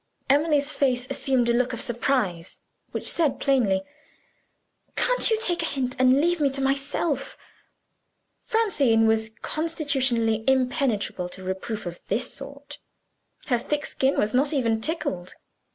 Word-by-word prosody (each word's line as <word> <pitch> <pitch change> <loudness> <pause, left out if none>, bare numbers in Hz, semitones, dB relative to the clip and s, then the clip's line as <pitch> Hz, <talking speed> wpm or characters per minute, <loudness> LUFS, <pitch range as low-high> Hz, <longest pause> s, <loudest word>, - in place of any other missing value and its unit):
Emily's 295 0 +2
face 250 -3 +1
assumed 260 -3 +1
a 235 - +3
look 250 +1 +1
of 240 - -4
surprise 230 -8 -1 0.3
which - - -5
said 315 -5 +1
plainly, 220 -9 +2 1.1
Can't - - +2
you 445 -1 +2
take 350 -6 0
a - - 0
hint 260 -4 -2
and 255 +1 +5
leave 345 +3 +2
me 285 -2 +3
to 275 - -2
myself? 275 +1 -1 1.1
Francine 290 - +2
was 220 0 +2
constitutionally 265 -9 0
impenetrable 255 - +1
to 190 +1 -10
reproof 190 +4 -4
of 175 0 -7
this 210 +5 0
sort; 280 +1 -9 0.7
her 245 -4 +1
thick 295 +5 -2
skin 270 +1 0
was 210 - +1
not 280 +4 +2
even 230 -5 +1
tickled. 185 - -2
265 Hz, 135 wpm, -25 LUFS, 225-290 Hz, 1.1 s, and